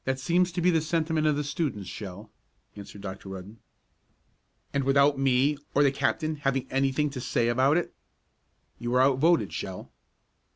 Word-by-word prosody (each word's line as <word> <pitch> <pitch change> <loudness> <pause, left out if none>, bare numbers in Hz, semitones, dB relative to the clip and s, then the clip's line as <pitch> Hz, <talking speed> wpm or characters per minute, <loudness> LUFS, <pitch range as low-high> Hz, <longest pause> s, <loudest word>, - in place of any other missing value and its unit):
"That 130 0 0
seems 175 +6 +1
to 175 - -2
be 180 +1 +4
the 165 -2 +2
sentiment 160 0 0
of 150 - +2
the 150 - -1
students, 140 - -3
Shell," 100 +1 -8 0.4
answered 100 0 -10
Dr. 95 0 -7
Rudden. 95 +4 -9 1.1
"And 140 - +1
without 140 +1 +3
me, 135 +2 +2 0.2
or 145 - +5
the 140 - +4
captain, 150 +3 -1
having 135 -2 -1
anything 135 +2 +1
to 130 -2 -6
say 120 -1 0
about 130 +6 +3
it?" 175 - -2 0.9
"You 120 - -4
were 125 +1 +3
out 135 -1 +3
voted, 165 +3 +3
Shell." 95 -1 -6
135 Hz, 170 wpm, -27 LUFS, 120-155 Hz, 1.1 s, or